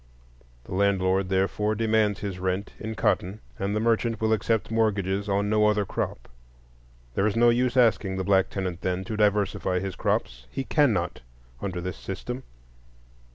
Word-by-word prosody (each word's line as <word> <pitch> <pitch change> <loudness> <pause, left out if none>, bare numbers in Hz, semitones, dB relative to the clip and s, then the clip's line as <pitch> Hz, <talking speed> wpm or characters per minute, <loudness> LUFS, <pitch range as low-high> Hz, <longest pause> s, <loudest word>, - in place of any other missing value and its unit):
The - - -9
landlord 95 -1 +2
therefore 95 +3 +1
demands 110 -2 +1
his 100 -3 -4
rent 95 +2 -2
in 110 +1 -5
cotton, 95 +1 0 0.2
and 100 +1 -1
the - - +1
merchant 115 0 +1
will 110 0 +2
accept 110 +1 0
mortgages 100 -3 0
on 100 +1 +1
no 105 0 +3
other 105 -1 +2
crop. - - -4 0.9
There 100 +10 +2
is 110 - -1
no 120 +1 +5
use 125 +1 +1
asking 100 -5 +3
the 95 - -1
black 95 -1 +3
tenant, 95 -3 -4
then, 90 0 -1
to 110 +3 -5
diversify 105 -3 +1
his 95 0 -3
crops,—he 60 - -2
cannot 120 - +1 0.4
under 90 -3 -3
this 90 +1 -5
system. 125 +7 -5
100 Hz, 155 wpm, -26 LUFS, 95-110 Hz, 0.9 s, no